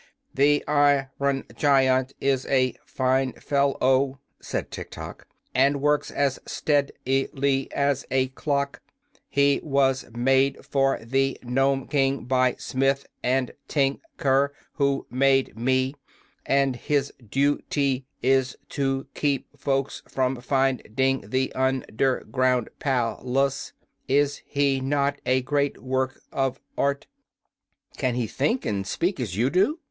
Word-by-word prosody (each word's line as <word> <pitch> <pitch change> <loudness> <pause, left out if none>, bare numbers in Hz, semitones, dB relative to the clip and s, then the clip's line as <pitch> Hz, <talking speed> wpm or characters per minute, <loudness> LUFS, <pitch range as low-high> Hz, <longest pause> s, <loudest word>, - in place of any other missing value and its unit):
"The 145 +2 +3
ir 145 -2 +3
on 140 -1 0
gi 145 - 0
ant 130 -1 +3
is 135 -1 0
a 130 -2 +2
fine 130 0 +1
fel 140 -1 0
low," 130 +1 +2 0.2
said - - -4
Tiktok, - - -8 0.3
"and 140 +2 +3
works 150 +1 +1
as 140 -2 0
stead 145 -2 +1 0.2
i 135 +1 +1
ly 135 -1 +1
as 140 -1 +1
a 130 0 +1
clock. 140 +1 -2 0.5
He 140 0 +3
was 135 -3 +1
made 135 +3 +2
for 135 -1 +2
the 135 +2 +1
Nome 135 +2 +1
King 135 -3 +1
by 130 0 +2
Smith 135 +1 0
& - - -47 0.4
Tin 140 -2 +1 0.2
ker, 140 +1 +2 0.2
who 140 -1 0
made 135 0 +2
me, 130 +3 +1 0.5
and 135 -2 +2
his 140 +1 -1
du 140 +6 +1
ty 135 -2 0 0.2
is 130 0 +2
to 135 -1 -1
keep 140 -2 -1
folks 135 0 -1
from 130 -1 -1
find 135 -3 0
ing 135 -5 +1
the 130 +2 0
un 130 -1 0
der 130 +2 +1
ground 130 -2 +1
pal 125 -5 0 0.2
ace. 135 -1 -5 0.4
Is 145 +1 +2
he 140 -2 +1
not 140 +1 0
a 130 0 +2
great 140 +1 0
work 130 0 -2
of 135 -1 -1 0.2
art?" 140 0 0 0.9
"Can 130 -4 0
he 120 -2 0
think, 230 - -1
and 100 -2 -2
speak, 175 - -1
as 105 -7 -3
you 125 +5 +2
do?" 195 - +2
135 Hz, 140 wpm, -25 LUFS, 130-140 Hz, 0.9 s, The